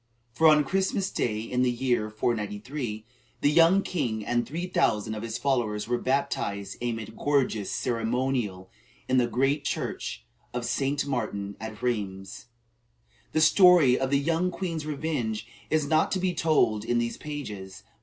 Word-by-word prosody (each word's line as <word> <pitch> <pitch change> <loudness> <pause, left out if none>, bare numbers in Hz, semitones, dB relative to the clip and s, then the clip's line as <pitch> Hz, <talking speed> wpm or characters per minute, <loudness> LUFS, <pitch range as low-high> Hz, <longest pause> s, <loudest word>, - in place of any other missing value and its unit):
For 160 +7 +4
on 150 -1 +6
Christmas 190 +4 0
day, 110 -2 -1
in 125 +2 -1
the 125 - +3
year 120 -3 0
493, 110 +2 -3 0.4
the 145 - +4
young 170 +5 +5
king 115 - -2
and 120 0 0
three 170 +5 -3
thousand 110 - +1
of 105 - -5
his 115 0 -4
followers 120 -7 0
were 120 0 0
baptized 100 -7 -1
amid 115 -2 -4
gorgeous 135 -8 0
ceremonial 115 -5 -1 0.4
in 130 0 +3
the 120 - +2
great 135 +5 +1
church - - -4 0.3
of 120 -1 -2
St. 140 +2 0
Martin 105 -7 -3
at 110 0 -8
Rheims. 100 -3 -3 0.9
The 155 - +2
story 165 -6 +6
of 130 - 0
the 140 - +3
young 165 +5 +1
queen's 170 -4 -4
revenge 140 -8 -2 0.2
is 155 -2 +2
not 155 +2 +2
to 190 - 0
be 185 -1 0
told 115 -12 +2
in 120 +1 0
these 120 0 -1
pages. 105 -11 -7
125 Hz, 155 wpm, -27 LUFS, 110-150 Hz, 0.9 s, on